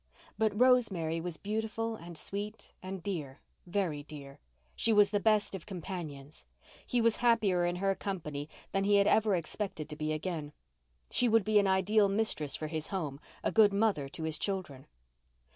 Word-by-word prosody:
But 215 -1 0
Rosemary 200 -11 +3
was 175 -2 -4
beautiful 220 +2 -2
and 170 -4 -10
sweet 205 +6 -6
and 185 -1 -6
dear—very 170 0 -4
dear. 145 -2 -11 0.4
She 230 - +1
was 205 -2 +5
the 205 - +2
best 215 -1 +2
of 190 0 -7
companions. 160 -6 -7 0.4
He 245 - +1
was 230 -1 +4
happier 215 -7 +3
in 175 - -1
her 195 +2 +1
company 155 -7 -5 0.2
than 195 - +1
he 205 +1 +4
had 200 0 +5
ever 215 -1 +4
expected 175 -1 -4
to 150 - -6
be 155 +1 -2
again. 155 -2 -3 0.6
She 245 - +2
would 225 -1 +4
be 215 0 +4
an 200 - +2
ideal 195 +2 +3
mistress 195 -8 0
for 155 - -4
his 155 0 -3
home, 150 -8 -3 0.2
a - - +1
good 210 -2 +5
mother 200 -10 +1
to 160 - -6
his 160 -1 -2
children. 185 -10 -3
190 Hz, 170 wpm, -32 LUFS, 155-210 Hz, 0.6 s, was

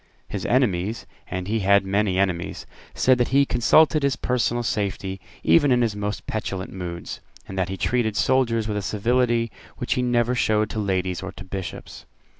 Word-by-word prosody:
His - - -4
enemies, 110 -4 +1 0.2
and 90 0 -4
he 110 +2 0
had 100 0 +4
many 100 -1 +1
enemies, 95 -3 -1 0.3
said 130 -1 +3
that 120 - +2
he 140 +2 +4
consulted 155 +6 +4
his 140 -1 +1
personal 120 -1 0
safety 95 -3 -2 0.2
even 105 - +4
in 125 -1 +4
his 110 -3 0
most 105 0 -4
petulant 95 -3 -4
moods, 85 -2 -6 0.3
and 95 - -7
that 95 -2 -1
he 95 - -4
treated 115 0 0
soldiers 115 -1 +2
with 105 -1 -2
a - - -1
civility 115 +3 +1 0.3
which - - -1
he 125 - 0
never 120 -1 +1
showed 110 -3 +1
to 110 - -3
ladies 95 -3 -1
or 95 - -6
to - - -10
Bishops. 95 -1 -7
105 Hz, 180 wpm, -24 LUFS, 95-120 Hz, 0.3 s, had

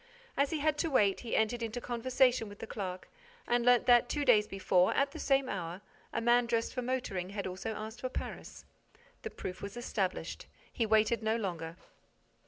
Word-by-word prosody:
As 280 0 +2
he 320 - -1
had 300 0 +1
to 330 - +1
wait, 205 -8 +3
he 235 - -3
entered 220 +2 +1
into 230 +1 -3
conversation 245 -1 +1
with 205 - -11
the - - -6
clerk 185 -4 -5 0.4
and 240 0 +2
learnt 245 0 +5
that, 245 -1 +5
two 290 -1 -1
days 215 -5 +5
before, 185 -1 +2
at 275 0 +2
the - - -8
same 270 -1 +2
hour, 175 -3 -4 0.3
a - - -1
man 240 +1 +3
dressed 230 -1 0
for 250 - -2
motoring 240 -8 -2
had 200 0 -4
also 185 +4 -4
asked 220 +3 -7
for 255 - -2
Paris. - - -7 0.6
The 445 - -5
proof 185 - -7
was 200 +3 -6
established. 200 -6 -3 0.3
He 230 - 0
waited 220 +1 +3
no 220 0 +1
longer. 170 -7 -4
230 Hz, 190 wpm, -32 LUFS, 200-250 Hz, 0.6 s, learnt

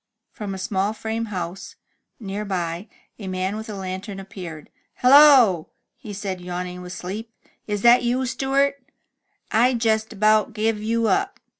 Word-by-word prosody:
From 200 -2 -6
a - - -6
small 195 +2 -1
frame 220 +1 -3
house, 185 -3 -6 0.4
near 205 -1 -4
by, 180 -1 -3 0.3
a 200 - -7
man 185 +2 -2
with 220 +1 -7
a 210 - -5
lantern 190 +1 -6
appeared. 180 -5 -9 0.2
Hello! 255 - +6
'' - - -56
he 210 - -10
said, 195 -2 -5
yawning 180 0 -5
with 180 0 -8
sleep. 200 +6 -6 0.2
" - - -42
Is 205 -1 -2
that 240 +1 +7
you, 245 +2 0
Stewart? 275 +2 0 0.7
rd 245 +3 +4
jest 220 -1 +1
about 215 +1 +2
give 215 0 0
you 230 +1 0
up." 395 - 0
210 Hz, 160 wpm, -23 LUFS, 190-230 Hz, 0.7 s, that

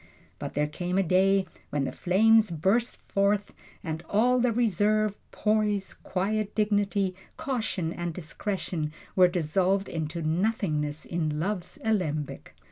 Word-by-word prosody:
But - - -6
there 150 +1 +2
came 175 +5 -3
a 195 - +4
day 190 +2 +3 0.2
when 145 -1 -1
the - - -2
flames 220 +4 +4
burst 195 +9 +1
forth, 200 +1 +1 0.3
and 160 -1 -3
all 245 +5 +3
the 245 0 +3
reserve, 215 -2 +2 0.2
poise, 210 -2 0
quiet 205 +3 -2
dignity, 205 -2 +1 0.2
caution 220 -10 -2
and 175 0 -3
discretion 160 -1 -4 0.2
were 185 -1 +7
dissolved 185 +3 +1
into 160 0 -3
nothingness 155 -4 0
in 155 -3 -2
love's 185 +1 -3
alembic. 165 -10 -2
190 Hz, 125 wpm, -27 LUFS, 165-210 Hz, 0.3 s, were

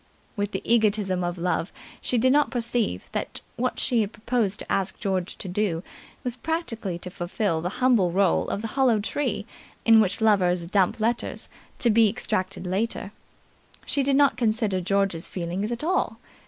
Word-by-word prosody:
With 205 -1 -2
the - - -4
egotism 210 -5 +2
of 175 +1 -2
love, 175 +1 -1 0.3
she 250 - 0
did 255 +3 +4
not 295 0 +4
perceive 235 - -1
that - - -4
what 250 +1 -1
she 230 -5 +2
proposed 220 -1 -1
to - - -8
ask 195 0 0
George 190 -2 -2
to - - -6
do 180 -3 -1 0.4
was 245 -1 -1
practically 235 - -3
to 180 +1 -6
fulfil 175 -1 -1
the 175 - -2 0.2
humble 225 -9 +4
role 190 +1 +2
of 205 - -3
the 225 - -3
hollow 255 -3 +3
tree 220 -1 -2 0.4
in 225 -1 +7
which 200 -2 0
lovers 185 -6 +3
dump 195 +4 +1
letters, 230 +2 -1 0.3
to 235 - +3
be 220 0 +5
extracted 185 -2 -2
later; 195 +2 -2 0.7
she 280 - 0
did 275 0 +2
not 280 -4 +4
consider 215 -5 +1
George's 195 -2 0
feelings 185 +5 -3
at 240 +4 -3
all. 370 +4 0
210 Hz, 165 wpm, -25 LUFS, 185-235 Hz, 0.7 s, in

